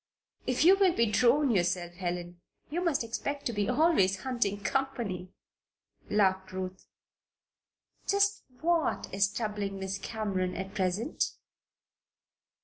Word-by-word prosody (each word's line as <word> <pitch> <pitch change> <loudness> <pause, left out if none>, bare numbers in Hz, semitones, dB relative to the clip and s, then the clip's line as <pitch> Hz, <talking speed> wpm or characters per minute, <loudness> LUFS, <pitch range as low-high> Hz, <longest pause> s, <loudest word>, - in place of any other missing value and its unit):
"If 255 +4 +2
you 380 +3 +8
will 375 -3 +4
be 230 - +3
a 220 - +1
drone 250 +6 +4
yourself, 175 -3 0
Helen, 175 -1 -4 0.3
you 350 +3 -1
must 325 -8 +1
expect 280 +5 -4
to 240 - -1
be 205 0 0
always 245 - +3
hunting 235 -6 0
company," 230 -9 -2 0.8
laughed 190 -2 +2
Ruth. 185 0 -5 1.2
"Just 400 0 +2 0.2
what 335 -2 0
is 195 +1 +2
troubling 210 -3 -3
Miss 190 0 -3
Cameron 195 -4 -2
at 190 +2 -5
present?" 200 - 0
205 Hz, 125 wpm, -30 LUFS, 190-270 Hz, 1.2 s, you